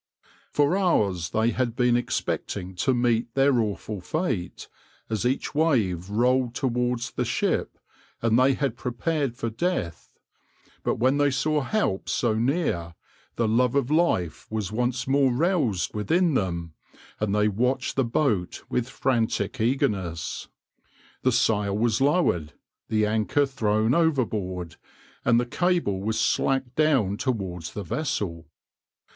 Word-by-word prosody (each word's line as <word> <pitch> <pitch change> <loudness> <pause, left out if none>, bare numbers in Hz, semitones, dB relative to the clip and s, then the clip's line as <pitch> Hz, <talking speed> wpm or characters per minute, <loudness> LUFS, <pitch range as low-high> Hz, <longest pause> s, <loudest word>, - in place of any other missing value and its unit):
For 145 +4 +2
hours 100 - +1
they 110 +4 +1
had 120 -2 -1
been 125 -1 +3
expecting 95 -5 -2
to 130 - +2
meet 120 -1 0
their 135 -2 +4
awful 105 -2 -3
fate, 125 - -3 0.4
as 110 +2 0
each 130 - -2
wave 110 - +1
rolled 125 +3 +1
towards 125 -2 -1
the - - -1
ship, - - -1 0.4
and 115 +1 +2
they 130 +1 +4
had 135 -5 -1
prepared 125 +1 -2
for 115 - -3
death; 115 - -2 0.7
but - - 0
when 130 +5 +2
they 145 0 +4
saw 150 +3 +1
help 140 - -1
so 115 -2 +1
near, 110 - -1 0.4
the 115 - +1
love 120 +3 +2
of 140 -1 +1
life 150 - +1
was 105 -3 -3
once 125 +2 -1
more 135 -1 +3
roused 130 - +1
within 165 - +1
them, 85 - -2 0.5
and 105 -1 0
they 105 0 +3
watched 125 +6 0
the 135 - +2
boat 115 -7 0
with 125 +1 -1
frantic 115 -3 -1
eagerness. 100 -9 -1 0.7
The 130 - +3
sail 105 -4 +1
was 115 +2 +1
lowered, 135 - +2 0.4
the 110 -1 +2
anchor 110 +7 +1
thrown 110 -3 +1
overboard, 105 - 0 0.5
and 120 -1 +4
the 120 - 0
cable 170 - 0
was 110 +2 -1
slacked 130 +2 +1
down 135 -11 +2
towards 95 - -3
the 105 - -4
vessel. 90 - -3
120 Hz, 135 wpm, -25 LUFS, 105-135 Hz, 0.7 s, their